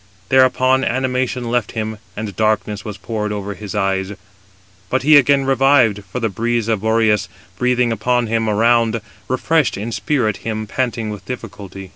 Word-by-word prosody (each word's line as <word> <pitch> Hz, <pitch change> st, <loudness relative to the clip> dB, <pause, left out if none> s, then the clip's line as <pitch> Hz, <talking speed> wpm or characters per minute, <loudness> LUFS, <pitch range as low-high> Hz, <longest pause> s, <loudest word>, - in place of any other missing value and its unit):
Thereupon 130 Hz, 0 st, +4 dB
animation 125 Hz, -1 st, -1 dB
left 120 Hz, -3 st, -1 dB
him, 110 Hz, -1 st, -4 dB, 0.2 s
and 105 Hz, -3 st, -5 dB
darkness 110 Hz, 0 st, 0 dB
was 105 Hz, -2 st, -6 dB
poured 105 Hz, +2 st, -3 dB
over 100 Hz, -1 st, -4 dB
his 100 Hz, +2 st, -8 dB
eyes; 95 Hz, -1 st, 0 dB, 0.8 s
but 130 Hz, 0 st, 0 dB
he 155 Hz, +2 st, +6 dB
again 140 Hz, -1 st, +5 dB
revived, 130 Hz, -6 st, +3 dB
for 125 Hz, -, -3 dB
the 115 Hz, -, 0 dB
breeze 115 Hz, +2 st, -1 dB
of 110 Hz, -4 st, 0 dB
Boreas, 110 Hz, -2 st, +2 dB, 0.3 s
breathing 125 Hz, -1 st, +2 dB
upon 120 Hz, +2 st, +1 dB
him 115 Hz, 0 st, 0 dB
around, 115 Hz, +1 st, +3 dB, 0.3 s
refreshed 150 Hz, +2 st, +1 dB
in 110 Hz, +4 st, -4 dB
spirit 115 Hz, -3 st, 0 dB
him 110 Hz, -1 st, -4 dB
panting 115 Hz, -1 st, -2 dB
with 105 Hz, -3 st, -8 dB
difficulty. 100 Hz, -5 st, -8 dB
115 Hz, 155 wpm, -19 LUFS, 105-125 Hz, 0.8 s, he